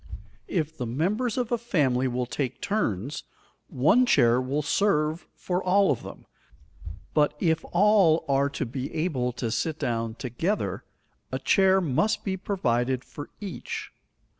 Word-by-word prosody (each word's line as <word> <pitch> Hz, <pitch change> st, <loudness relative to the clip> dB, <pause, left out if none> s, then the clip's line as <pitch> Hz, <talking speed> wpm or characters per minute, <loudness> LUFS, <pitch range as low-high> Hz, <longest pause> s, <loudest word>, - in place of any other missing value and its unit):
If 160 Hz, -3 st, -2 dB
the 125 Hz, -, -2 dB
members 205 Hz, -, -1 dB
of 250 Hz, -2 st, -1 dB
a 240 Hz, -, +1 dB
family 140 Hz, -, +1 dB
will 125 Hz, 0 st, -1 dB
take 130 Hz, 0 st, -3 dB
turns, 135 Hz, -, -2 dB, 0.4 s
one 205 Hz, -, +3 dB
chair 120 Hz, -, +4 dB
will 140 Hz, +4 st, -1 dB
serve 155 Hz, -2 st, +1 dB
for 180 Hz, +1 st, -2 dB
all 195 Hz, 0 st, +4 dB
of 130 Hz, -, -1 dB
them; -, -, -10 dB, 0.9 s
but 150 Hz, -1 st, +2 dB
if 160 Hz, -2 st, +1 dB
all 185 Hz, -4 st, +4 dB
are 140 Hz, 0 st, +2 dB
to 140 Hz, -1 st, -3 dB
be 130 Hz, +3 st, -5 dB
able 150 Hz, -7 st, 0 dB
to 120 Hz, -2 st, -3 dB
sit 160 Hz, +6 st, -1 dB
down 115 Hz, -3 st, -2 dB
together, 135 Hz, -, -2 dB, 0.5 s
a -, -, -1 dB
chair 190 Hz, -1 st, +4 dB
must 175 Hz, +7 st, 0 dB
be 190 Hz, -2 st, -1 dB
provided 130 Hz, -, -1 dB
for 145 Hz, -, -9 dB
each. 200 Hz, -3 st, -6 dB
150 Hz, 145 wpm, -26 LUFS, 125-190 Hz, 0.9 s, chair